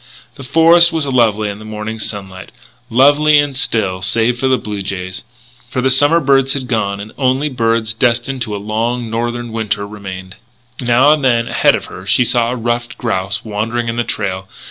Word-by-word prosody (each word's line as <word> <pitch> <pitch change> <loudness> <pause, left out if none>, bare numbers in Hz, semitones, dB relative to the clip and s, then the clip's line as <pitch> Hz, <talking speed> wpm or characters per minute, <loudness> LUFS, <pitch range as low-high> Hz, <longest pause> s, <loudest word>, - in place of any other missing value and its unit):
The 140 - -11
forest 165 +5 +5
was 160 -3 0
lovely 115 -5 +1
in 100 0 -6
the - - -11
morning 110 +1 -6
sunlight 95 -3 -6 0.4
lovely 145 +5 +4
and 145 -2 +1
still 100 -7 -1
save 115 +5 +1
for 130 - 0
the 130 -1 +3
blue 105 -4 -5
jays 95 0 -5 0.5
for 130 - -3
the 130 +1 +2
summer 145 +6 +4
birds 135 -2 +2
had 130 -3 -4
gone 100 -4 -1
and 105 +2 -8
only 135 +2 +1
birds 115 -3 0
destined 120 +3 0
to 110 -3 -3
a - - -3
long 115 +3 -3
Northern 120 +1 -3
winter 105 -2 -2
remained. 95 -2 -9 0.4
Now 125 +4 +4
and 150 -2 -2
then, 120 -3 +2
ahead - - +3
of - - -5
her, 95 +1 -11
she 105 +5 +4
saw 120 -1 +1
a 125 - -2
ruffed 120 0 -3
grouse 100 -3 -2
wandering 115 +3 -2
in 115 - -3
the 120 - 0
trail. 95 -4 -4
115 Hz, 190 wpm, -16 LUFS, 105-130 Hz, 0.5 s, forest